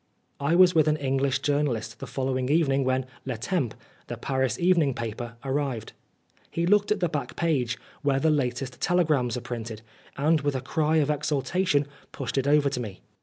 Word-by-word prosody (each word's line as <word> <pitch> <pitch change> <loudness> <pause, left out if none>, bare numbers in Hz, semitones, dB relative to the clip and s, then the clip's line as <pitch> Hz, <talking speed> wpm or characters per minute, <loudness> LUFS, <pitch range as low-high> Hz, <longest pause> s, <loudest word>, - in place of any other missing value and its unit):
I 145 +4 +2
was 180 0 +7
with 155 -3 +4
an 155 0 +3
English 135 -1 0
journalist 130 -7 0
the - - -6
following 130 -1 -1
evening 140 -3 +3
when 130 0 +1 0.2
Le 125 -3 -3
Temps, 130 - -1 0.3
the - - -5
Paris 130 -3 -1
evening 170 -7 +3
paper, 115 +1 -5
arrived. 135 -5 -2 0.6
He 170 - -1
looked 205 +3 +3
at 210 -2 +1
the 175 - +3
back 150 -3 -4
page, 140 -9 0 0.2
where 140 -2 +2
the 160 +2 +3
latest 130 -2 -2
telegrams 150 -9 +2
are - - -4
printed, 115 -2 -6 0.3
and 155 +2 +3
with 145 -1 0
a 130 - -1
cry 155 +4 0
of 150 -2 +3
exultation 145 +2 +1 0.3
pushed 135 -1 -2
it 135 - -1
over 145 0 +4
to 135 - -1
me. 105 -6 -6
140 Hz, 180 wpm, -26 LUFS, 125-155 Hz, 0.6 s, was